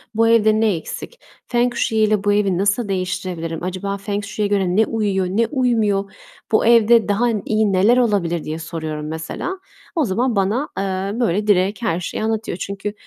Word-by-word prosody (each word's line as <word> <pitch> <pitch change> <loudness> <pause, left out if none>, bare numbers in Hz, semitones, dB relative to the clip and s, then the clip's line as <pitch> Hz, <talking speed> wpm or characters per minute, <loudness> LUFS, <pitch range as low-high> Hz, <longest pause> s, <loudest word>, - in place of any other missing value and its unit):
"Bu 230 0 +3
evde 220 -1 +4
ne 220 -4 +2
eksik? 475 - -7 0.3
Feng 245 0 +1
shui 220 - 0
ile 215 -2 +2
bu 205 - +2
evi 200 -3 +1
nasıl 205 +3 +1
değiştirebilirim? 180 -3 -3
Acaba 185 +2 -3
feng 200 +1 -3
shui'ye 210 0 -2
göre 195 -3 0
ne 220 +1 +4
uyuyor, 205 -4 -1
ne 220 +5 +1
uymuyor? 220 -8 0 0.4
Bu 220 - +3
evde 230 -1 +5
daha 220 +4 +2 0.2
iyi 215 -2 +1
neler 210 +7 +4
olabilir?" 195 -9 +1
diye 155 +1 -5
soruyorum 155 -2 -5
mesela. 160 - -5 0.4
O 315 - +2
zaman 235 +3 0
bana, 210 +9 0
eee, 195 +3 -2
böyle 210 -3 0
direkt 200 +2 +2
her 180 -7 0
şeyi 180 +4 -4
anlatıyor. 220 -4 -2
Çünkü 200 +2 -5
205 Hz, 175 wpm, -20 LUFS, 185-225 Hz, 0.4 s, evde